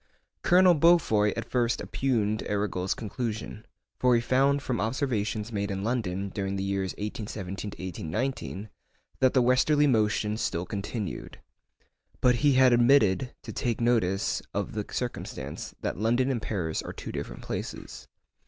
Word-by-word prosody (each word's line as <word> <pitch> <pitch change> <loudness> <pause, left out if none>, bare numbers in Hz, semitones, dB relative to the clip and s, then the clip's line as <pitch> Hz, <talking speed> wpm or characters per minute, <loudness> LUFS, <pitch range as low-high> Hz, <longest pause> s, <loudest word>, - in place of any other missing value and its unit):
Colonel 180 0 +6
Beaufoy 145 -11 +4
at - - -4
first 120 -2 +1
oppugned 110 -5 0
Arago's 95 -3 -1
conclusion, 110 0 -5 0.3
for 125 -1 +4
he - - +4
found 135 +3 +2
from 125 -3 -1
observations 110 -2 -1
made 100 -1 -2
in 95 -1 -3
London, 100 -5 -1
during 100 0 -3
the 95 - -2
years 95 -1 -1
1817 105 -2 -5 0.4
1819, 105 +1 -3 0.5
that 130 0 +3
the 130 - +5
westerly 145 +4 +4
motion 105 -4 +2
still 85 -5 -2
continued. 100 +1 -5 0.8
But 125 -1 +4
he 145 +2 +4
had 130 -1 +6
omitted 120 -1 +4
to - - -7
take 120 -4 -1
notice 110 -5 +1
of - - -1
the - - -3
circumstance, 70 +3 -5
that - - -3
London 120 +5 +2
and 120 -4 -2
Paris 90 -7 -2
are - - -7
two - - -7
different - - -6
places. - - -6
110 Hz, 145 wpm, -28 LUFS, 100-130 Hz, 0.8 s, Colonel